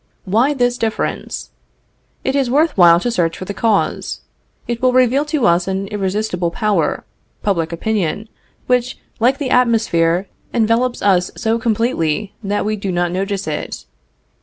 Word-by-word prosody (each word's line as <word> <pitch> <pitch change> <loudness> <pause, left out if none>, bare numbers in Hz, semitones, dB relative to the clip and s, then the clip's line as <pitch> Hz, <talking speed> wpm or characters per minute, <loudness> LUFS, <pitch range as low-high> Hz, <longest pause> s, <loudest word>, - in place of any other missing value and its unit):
Why 235 +10 +2
this 245 -1 +1
difference? 220 -1 -3 0.7
It 265 - 0
is 270 -3 +1
worth 300 +5 +2
while 170 -2 +7
to 240 - -1
search 170 -7 0
for 185 - -6
the 200 - -5
cause. 220 -1 0 0.5
It 235 -1 -3
will 255 -1 +3
reveal 255 +3 +3
to 300 -4 0
us 175 +1 +3
an 190 +1 -2
irresistible 195 -3 -1
power, 210 +3 0 0.4
public 170 -6 0
opinion, 205 +2 -2 0.4
which, 250 0 0 0.2
like 250 +4 +3
the 280 -4 -3
atmosphere, 200 -8 +2 0.3
envelopes 235 +2 +1
us 185 -3 +3
so 230 0 0
completely 215 - 0
that 205 +1 -1
we 215 0 -1
do 195 -1 -3
not 175 -1 0
notice 195 +2 -2
it. 155 - -5
215 Hz, 150 wpm, -18 LUFS, 185-245 Hz, 0.7 s, while